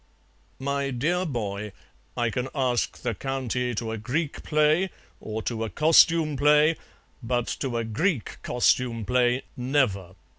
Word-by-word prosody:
"My 140 +1 -2
dear 170 +9 0
boy, 105 -6 -4 0.4
I 120 -2 +1
can 125 +4 -2
ask 125 -3 -1
the 120 -2 -1
County 125 0 -2
to 110 +1 -3
a 110 - -4
Greek 140 +8 -2
play, 155 +4 +2 0.3
or 110 0 -5
to 115 -2 -2
a 110 - -3
costume 160 +1 +4
play, 150 +3 +5 0.5
but 120 0 -1
to 130 -4 -2
a 115 - -1
Greek 120 - -1
costume 120 -2 +1
play, 125 +3 +2
never. 125 -9 0
125 Hz, 140 wpm, -26 LUFS, 115-150 Hz, 0.5 s, play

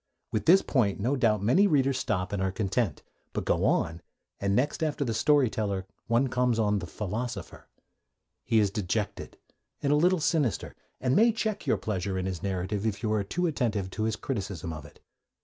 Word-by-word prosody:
With 110 - -2
this 190 +4 +7
point 105 -8 +1
no 125 +8 +1
doubt 110 -6 +2
many 175 - +5
readers 135 -5 +2
stop 90 -4 -1
and 100 - -1
are 95 0 0
content. 100 - -1 0.3
But - - -3
go - - +1
on, 80 +2 +1 0.4
and 100 0 +1
next 140 +8 0
after 150 -2 0
the 115 - -1
story 145 +4 +4
teller 100 -3 -2 0.2
one 120 +3 +3
comes 125 -2 +1
on 105 -2 +2
the 85 - -6
philosopher. 105 +3 -5 0.8
He 115 - +1
is 105 -3 +3
dejected 105 +1 -3 0.4
and 140 0 +1
a - - +5
little 175 +4 +3
sinister, 150 -6 0 0.2
and 130 +1 +1
may 230 +2 +6
check 220 -2 -3
your - - +3
pleasure 95 -2 -2
in 95 - -2
his 90 -4 -3
narrative 95 +1 -2
if 105 -2 -2
you 110 -1 +1
are 105 -2 +1
too 175 - -2
attentive 110 - -1
to 110 - -2
his 110 -1 0
criticism 100 -7 -4
of 80 - -8
it. - - -16
110 Hz, 195 wpm, -28 LUFS, 100-135 Hz, 0.8 s, this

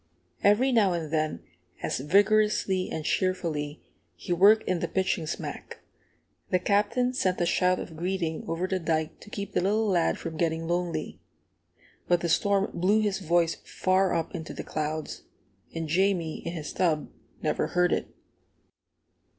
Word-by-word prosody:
Every 225 +7 +4
now 210 -6 +4
and 160 -3 -4
then, 155 - -1 0.4
as - - -1
vigorously 200 +3 +2
and 155 - -4
cheerfully 160 -6 -1 0.3
he 175 - -3
worked 205 +5 +5
in 185 -2 +1
the - - -1
pitching 185 -4 -1
smack, 160 - -6 0.7
the 185 - +3
Captain 210 +7 +1
sent 185 -7 0
a 175 - +2
shout 180 +1 +2
of 160 - -7
greeting 170 -1 -2
over 165 +2 -1
the 185 0 -1
dike 160 -1 -1
to - - -13
keep 200 -1 -6
the 180 - +2
little 210 +4 +1
lad 175 -4 +2
from 165 -2 -6
getting 165 0 -1
lonely. 170 -2 -2 0.9
But 175 -1 +3
the 170 - -1
storm 200 +3 +2
blew 200 +5 +2
his 205 -2 0
voice 170 -2 +1
far 185 0 +1
up 165 -1 -2
into 160 -3 -6
the - - -5
clouds, 155 0 -4 0.5
and 165 -1 -3
Jamie, 175 -1 +1
in 170 - -3
his 155 -3 -6
tub, 160 -5 +1 0.4
never - - 0
heard 180 0 +2
it. - - -1
180 Hz, 160 wpm, -27 LUFS, 160-195 Hz, 0.9 s, worked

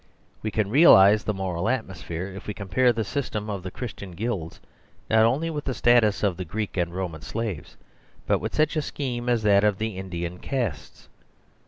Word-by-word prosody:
We 110 - -2
can 105 -2 -1
realise 105 - +7
the 110 - -1
moral 95 +1 -2
atmosphere 90 -8 -3
if 100 +1 -9
we 105 - -4
compare 110 +5 +2
the 115 -1 -1
system 110 -3 -3
of 100 -2 -4
the 95 - -6
Christian 100 -4 -7
guilds, 95 -4 -4 0.5
not 110 0 +6
only 145 +8 +1
with 150 -2 -5
the 130 - -2
status 115 -3 +3
of 95 -4 +1
the 95 - -3
Greek 105 +4 -4
and 85 -2 0
Roman 85 -4 -4
slaves, 110 -1 -5 0.5
but - - +2
with - - -5
such 155 +1 +2
a 155 - +1
scheme 125 -5 -4
as 120 -3 +1
that 100 -1 +4
of 105 -2 +2
the 110 -3 -3
Indian 90 -2 -5
castes. 120 - -4
105 Hz, 190 wpm, -25 LUFS, 95-120 Hz, 0.5 s, realise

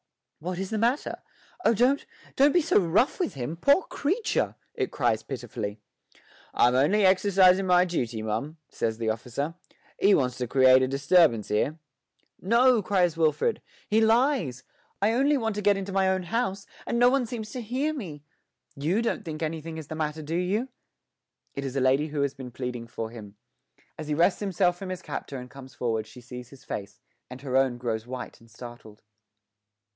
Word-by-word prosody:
'What 180 +3 -4
is 190 +2 -4
the 220 - -1
matter? 240 +6 0 0.4
Oh, 230 - +4
don't 255 +6 +3 0.3
don't 280 +2 +5
be 350 - +6
so 330 -4 +4
rough 195 - +2
with 355 - -1
him, 130 +4 -4
poor 280 - +4
creature!' 380 +12 -1 0.2
it 405 -4 -2
cries 110 -2 +1
pitifully. 110 -5 -6 0.8
'I'm 125 - +4
only 160 +11 +3
exercisin' 190 0 +4
my 180 0 +5
duty, 120 -11 -2
mum,' 140 +9 -3
says 110 -1 -2
the 115 -1 -1
officer; 125 +7 -4 0.5
'he 200 +1 +5
wants 125 -3 0
to 125 - -2
create 130 +1 +6
a 130 - +2
disturbance 140 - +3
'ere.' 140 +9 0 0.6
'No,' 235 +3 +4
cries 180 -4 +1
Wilfred, 165 - +1 0.3
'he 220 +1 +3
lies! 225 - +2 0.4
I 210 +3 +2
only 280 +4 +3
want 225 -3 -1
to 210 - -3
get 205 0 +3
into 195 0 -5
my 190 0 +2
own 190 -1 0
house, 200 0 -2 0.2
and 235 - 0
no 245 +1 +5
one 265 -3 +1
seems 220 -2 -6
to 255 - -5
hear 260 +7 -1
me. 165 - -7 0.5
You 170 +11 0
don't 230 - -1
think 160 -3 -5
anything 160 0 -4
is 160 - -7
the - - -4
matter, 155 0 -3
do 160 +3 -3
you?' 200 +8 0 0.8
It 140 - -5
is 135 -1 -5
a 135 - +1
lady 135 +4 +3
who 145 -1 -3
has 140 -1 -1
been 130 -2 -8
pleading 125 -1 -5
for 115 -1 -5
him; 105 -3 -11 0.6
as 155 - -6
he 150 - 0
wrests 175 +4 +3
himself 180 -3 +1
from 195 - -6
his 185 -1 -5
captor 140 - -5
and 125 0 -9
comes 135 -2 -12
forward 110 -3 -2
she 110 +3 -13
sees 125 0 -9
his 135 -1 -15
face, 105 +2 -6 0.3
and 125 +1 -9
her 130 -2 -3
own 130 -2 +3
grows 115 -2 -3
white 130 0 -7
and 115 - -19
startled. 120 -2 -12
160 Hz, 190 wpm, -27 LUFS, 125-210 Hz, 0.8 s, be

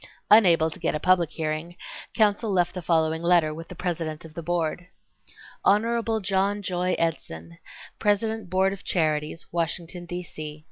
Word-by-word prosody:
Unable 170 -7 +6
to - - -10
get 165 - -1
a - - -1
public 180 -1 +3
hearing, 160 +2 -4 0.4
counsel 215 -1 +2
left 180 -2 +1
the 180 - -5
following 160 -1 +1
letter 170 -3 +3
with 165 +2 -8
the 180 - -10
President 165 -3 -3
of 160 - -12
the 170 - -6
Board: 175 +1 -2 0.8
Hon. 225 +2 +2
John 200 +2 0
Joy 180 -1 0
Edson, 85 - -3 0.4
President 210 -1 0
Board 190 +2 +2
of 195 - -10
Charities, 155 -2 -1
Washington, 170 +1 -3
D. 175 +1 -4
C. 155 -2 -8
175 Hz, 155 wpm, -25 LUFS, 160-190 Hz, 0.8 s, Unable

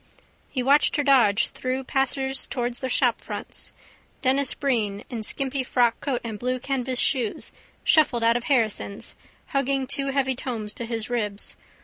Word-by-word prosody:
He 255 - -2
watched 280 +3 +4
her 290 - +1
dodge 230 -6 +4
through 255 +1 -3
passers 270 0 0
towards 245 -2 -2
the 260 - -3
shopfronts. - - +1 0.5
Denis 265 0 +3
Breen 215 -8 -1
in 235 -2 -3
skimpy 265 +4 -1
frockcoat 245 +1 +1
and 220 -3 -5
blue 255 +1 -1
canvas 260 -1 -2
shoes 245 -4 +1 0.3
shuffled 270 -7 +4
out 230 0 +4
of 245 - -2
Harrison's 220 -6 0 0.4
hugging 275 -1 0
two 275 +2 0
heavy 270 -1 +1
tomes 230 -5 -4
to 235 - -5
his 230 0 -3
ribs. 210 -4 -2
255 Hz, 145 wpm, -25 LUFS, 230-270 Hz, 0.5 s, watched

